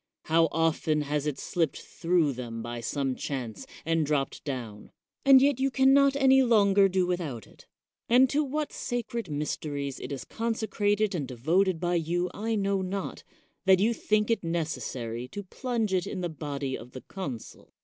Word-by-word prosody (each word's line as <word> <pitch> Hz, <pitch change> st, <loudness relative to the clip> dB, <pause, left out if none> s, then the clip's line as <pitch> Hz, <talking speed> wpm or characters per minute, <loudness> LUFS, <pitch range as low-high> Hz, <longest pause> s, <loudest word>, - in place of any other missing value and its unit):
How 165 Hz, +1 st, +3 dB
often 160 Hz, -1 st, +1 dB
has 150 Hz, 0 st, -1 dB
it 145 Hz, -, -2 dB
slipped 165 Hz, -4 st, -1 dB
through 165 Hz, -4 st, 0 dB
them 115 Hz, -2 st, -6 dB
by 120 Hz, 0 st, -5 dB
some 135 Hz, +2 st, -1 dB
chance, 125 Hz, -7 st, -5 dB, 0.2 s
and 165 Hz, 0 st, +2 dB
dropped 145 Hz, -2 st, -1 dB
down? 120 Hz, -7 st, -6 dB, 0.3 s
And 270 Hz, -1 st, +8 dB
yet 280 Hz, -2 st, +3 dB
you 270 Hz, +1 st, +2 dB
can 265 Hz, 0 st, +4 dB
not 275 Hz, 0 st, +5 dB
any 265 Hz, -1 st, +5 dB
longer 200 Hz, -5 st, +5 dB
do 185 Hz, -1 st, +1 dB
without 165 Hz, -, -3 dB
it; -, -, -19 dB, 0.4 s
and 250 Hz, +3 st, +6 dB
to 300 Hz, +2 st, +2 dB
what 300 Hz, +2 st, -3 dB
sacred 235 Hz, -4 st, -3 dB
mysteries 145 Hz, -2 st, -3 dB
it -, -, -7 dB
is 135 Hz, -4 st, -5 dB
consecrated 215 Hz, -2 st, 0 dB
and 150 Hz, -7 st, -2 dB
devoted 165 Hz, +9 st, +1 dB
by 175 Hz, +1 st, 0 dB
you 175 Hz, +2 st, -1 dB
I 225 Hz, +2 st, -2 dB
know 200 Hz, -1 st, 0 dB
not, 190 Hz, +1 st, -4 dB, 0.4 s
that 190 Hz, -1 st, +6 dB
you 220 Hz, +4 st, +3 dB
think 215 Hz, 0 st, +1 dB
it 230 Hz, -, 0 dB
necessary 130 Hz, -8 st, -3 dB
to 205 Hz, +8 st, -7 dB
plunge 225 Hz, 0 st, -2 dB
it 180 Hz, -2 st, +1 dB
in 185 Hz, -, -4 dB
the 175 Hz, -, -2 dB
body 140 Hz, -3 st, -4 dB
of 125 Hz, -, -10 dB
the 130 Hz, -, -7 dB
consul. 140 Hz, -, -8 dB
175 Hz, 175 wpm, -28 LUFS, 140-215 Hz, 0.4 s, And